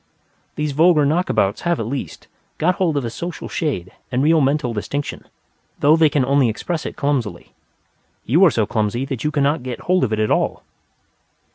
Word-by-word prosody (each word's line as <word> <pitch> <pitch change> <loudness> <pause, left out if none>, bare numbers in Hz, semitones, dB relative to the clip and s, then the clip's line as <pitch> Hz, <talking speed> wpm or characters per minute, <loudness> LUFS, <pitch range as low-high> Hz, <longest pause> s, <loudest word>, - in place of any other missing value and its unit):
These 150 -1 -2
vulgar 155 +1 +4
knockabouts 145 - +1
have, 170 -1 0
at 115 - -2
least, 130 +4 -5 0.3
got 175 +3 +1
hold 165 -6 +1
of 135 - -1
a 115 - -4
social 170 +8 -6
shade 95 - -3 0.2
and 130 +1 +1
real 160 +1 +4
mental 135 -2 +1
distinction, 140 +7 -4 0.5
though 150 +2 +5
they 160 -1 +4
can 145 -3 +1
only 135 -2 +3
express 160 +9 -3
it - - -7
clumsily. 125 - -2 0.7
You 160 - +4
are - - +7
so 110 -7 0
clumsy 110 +4 -1
that 135 -4 -5
you 150 - +1
cannot 145 0 +1
get 125 -1 -6
hold 185 0 +1
of 115 - 0
it 110 - 0
at 110 - +1
all. - - 0
140 Hz, 185 wpm, -20 LUFS, 120-160 Hz, 0.7 s, are